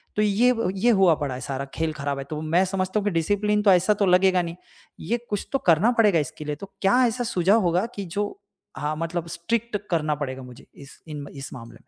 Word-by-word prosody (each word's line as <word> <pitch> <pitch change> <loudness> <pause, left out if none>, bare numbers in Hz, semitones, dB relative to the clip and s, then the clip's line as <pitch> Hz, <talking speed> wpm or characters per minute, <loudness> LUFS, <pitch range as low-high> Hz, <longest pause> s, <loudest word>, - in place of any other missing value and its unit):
तो 210 - +1
ये 215 +4 +3 0.3
ये 240 - +3
हुआ 190 -6 +5
पड़ा 140 -3 -3
है 130 - -7
सारा 135 +2 -4
खेल 160 -1 -1
ख़राब 140 -1 -3
है। 135 - -4
तो 155 -1 -4
मैं 165 +4 +2
समझता 185 +2 -1
हूँ - - -4
कि 205 - +1
डिसिप्लिन 205 +5 +1
तो 200 - +6
ऐसा 185 +3 +4
तो - - +5
लगेगा 185 0 +4
नहीं। 170 -1 -5 0.4
ये 235 - -1
कुछ 205 -1 -3
तो 275 - +2
करना 175 +9 +5
पड़ेगा 205 -7 +5
इसके 150 +1 -5
लिए। 150 0 -3
तो 195 +7 -11
क्या 245 +7 +4
ऐसा 240 +2 -2
सुझाव 200 0 +2
होगा 180 +2 +1
कि 200 - -4
जो 200 +4 -4 0.4
हाँ, 150 +1 -2
मतलब 165 +1 -3
स्ट्रिक्ट 225 +6 -2
करना 155 -3 +1
पड़ेगा 135 -2 -5
मुझे 125 -1 -13
इस 140 0 -14
इन 150 -2 -6
इस 135 -1 -7
मामले 115 -2 -10
में। - - -40
180 Hz, 235 wpm, -24 LUFS, 150-205 Hz, 0.4 s, तो